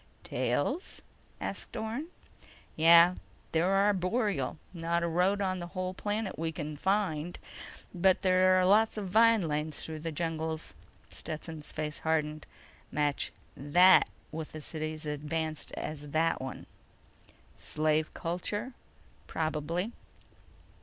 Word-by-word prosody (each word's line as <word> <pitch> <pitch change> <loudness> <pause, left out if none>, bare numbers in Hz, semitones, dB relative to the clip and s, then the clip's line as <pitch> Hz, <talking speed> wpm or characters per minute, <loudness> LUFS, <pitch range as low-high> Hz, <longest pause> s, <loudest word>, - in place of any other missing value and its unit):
"Tails?" 360 - -1 0.4
asked - - -5
Orne. 230 +8 -3 0.7
"Yeah. 170 +2 +7 0.3
They're 170 +4 +2
arboreal. 195 - +1 0.2
Not 170 0 -1
a - - +1
road 180 +4 +2
on 185 -1 0
the 175 - -5
whole 185 0 -1
planet 205 +1 -2
that - - -6
we 165 -1 -1
can 155 -1 -5
find. 175 -2 0 0.6
But 185 +1 +3
there 185 0 +5
are 185 - +3
lots 215 +4 +4
of 200 -3 -3
vine 225 -2 +5
lanes 150 0 -1
through 160 -1 -6
the 165 +1 -4
jungles." 160 0 -3 0.4
Stetson's 155 -1 -6
face 150 -1 -4
hardened. 155 -1 -1 0.4
"Match 145 -1 0 0.2
that 175 +7 +6 0.2
with 155 0 -6
a 155 - -6
city 155 +1 -3
as 155 0 -8
advanced 150 +1 -3
as 150 -1 -5
that 160 +1 +1
one." 130 0 -6 0.9
"Slave 155 0 0
culture?" 205 +8 -3 0.5
"Probably." 160 +6 -2
165 Hz, 125 wpm, -30 LUFS, 155-190 Hz, 0.9 s, Yeah